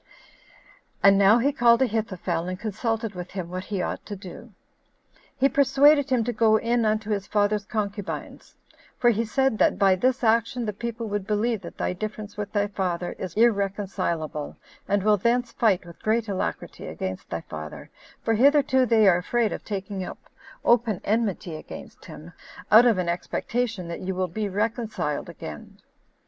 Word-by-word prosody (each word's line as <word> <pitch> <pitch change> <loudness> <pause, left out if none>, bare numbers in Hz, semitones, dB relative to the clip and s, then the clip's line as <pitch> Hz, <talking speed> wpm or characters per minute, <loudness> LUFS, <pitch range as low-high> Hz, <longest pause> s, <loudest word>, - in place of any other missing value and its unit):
And 200 0 +7
now 200 +3 +6
he 265 +4 +2
called 240 -2 +4
Ahithophel, 185 -7 -2
and 185 0 -4
consulted 225 0 -2
with 180 0 -7
him 185 -3 -5
what 185 +1 -5
he 195 -4 -2
ought - - -4
to 205 - -5
do: 195 +5 -11 0.9
he 270 - +4
persuaded 280 +2 +4
him 250 -3 +2
to 240 +2 -2
go 220 0 +4
in 235 +1 +1
unto 215 0 0
his 200 -2 -2
father's 205 -1 +1
concubines; 205 -2 -5 0.4
for 240 -1 +4
he 225 +1 0
said 265 +1 0
that - - +3
"by 195 -2 +4
this 255 +6 0
action 235 +2 +2
the 210 - -2
people 235 +2 -5
would 205 -1 -3
believe 215 0 0
that 170 - -10
thy - - -1
difference 210 +2 -6
with 205 -1 -5
thy 205 -1 +1
father 185 -3 -2
is 180 -3 -5
irreconcilable, 195 -8 0 0.3
and 200 -1 +1
will 210 0 +4
thence 235 +4 +1
fight 195 -6 +1
with 170 -1 -13
great 225 +1 +1
alacrity 195 -2 -4
against 95 0 -5
thy - - -3
father, 75 0 -9 0.3
for 225 - +1
hitherto 265 +1 +4
they 220 -2 +5
are 175 -3 +6
afraid 225 +4 0
of - - -6
taking 195 -2 -4
up - - -7 0.5
open 235 -4 +3
enmity 205 -6 -1
against 155 - -10
him, - - -11 0.4
out 230 +3 +8
of 225 -5 +3
an 180 -1 -1
expectation 205 +3 -2
that 170 - -6
you 185 0 -3
will 185 0 0
be 205 +4 -3
reconciled 210 - -2
again." 80 - -9
210 Hz, 170 wpm, -25 LUFS, 185-235 Hz, 0.9 s, out